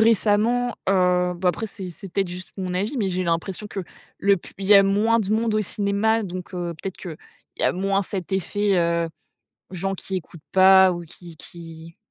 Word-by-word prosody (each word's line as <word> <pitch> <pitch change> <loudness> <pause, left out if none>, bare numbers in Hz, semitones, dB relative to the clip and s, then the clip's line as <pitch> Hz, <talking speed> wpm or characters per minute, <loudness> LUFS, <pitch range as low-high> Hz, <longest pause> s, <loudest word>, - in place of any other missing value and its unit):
récemment, 225 +2 +3
heu 180 -2 +3
bah 180 +1 0
après 220 +5 -1
c'est 195 -3 -8
c'est 195 +3 -10
peut-être 195 -2 0
juste 180 +1 -8
mon 185 -1 -3
avis, 205 +10 -2
mais 205 -4 0
j'ai 185 0 -1
l'impression 170 +4 -2
que 200 -1 -5 0.4
le 200 +1 +3
plus 175 - -13
il 195 - -4
y 205 - +7
a 200 - +9
moins 210 +4 +2
de 205 -3 -2
monde 220 0 +1
au 215 - +2
cinéma 205 +3 0
donc 185 -2 -7
heu, 175 -2 -4
peut-être 190 -1 -5
qu'il 170 -5 -7 0.4
y - - -3
a - - +3
moins 195 +2 0
cet 190 -1 -6
effet, 200 +1 0
heu, 170 0 +1 0.6
gens 190 +1 -3
qui 190 0 -4
écoutent 170 -2 -8
pas 190 0 +7
ou 175 0 -5
qui 170 0 -13
qui 165 0 -11
190 Hz, 205 wpm, -23 LUFS, 180-205 Hz, 0.6 s, a